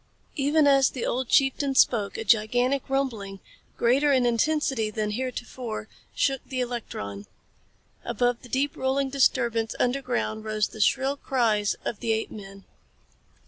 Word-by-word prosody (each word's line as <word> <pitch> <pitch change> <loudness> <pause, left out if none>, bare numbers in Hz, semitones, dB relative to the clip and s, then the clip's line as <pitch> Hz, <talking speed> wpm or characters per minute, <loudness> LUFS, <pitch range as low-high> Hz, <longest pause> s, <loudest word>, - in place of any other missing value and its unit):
Even 290 +2 +3
as 275 -2 +5
the 250 - -4
old 255 0 -2
chieftain 270 0 +2
spoke 210 -6 +3
a - - -3
gigantic 245 +6 +2
rumbling, 225 -8 -2 0.4
greater 270 +5 +3
in 260 -3 +3
intensity 240 -2 +1
than 215 0 -2
any - - -3
heretofore, 245 -3 -5 0.3
shook 270 -2 +1
the 260 - -5
electron. 160 - -5 0.8
Above 240 +1 0
the 245 - -13
deep 270 +4 0
rolling 265 +1 0
disturbance 235 -4 +1
underground 245 -4 -1
rose 215 -1 -1
the 220 - -7
shrill 270 +6 +2
cries 225 -7 +1
of 215 - -3
the 230 -1 0
apemen. 195 -3 -6
245 Hz, 140 wpm, -26 LUFS, 215-270 Hz, 0.8 s, as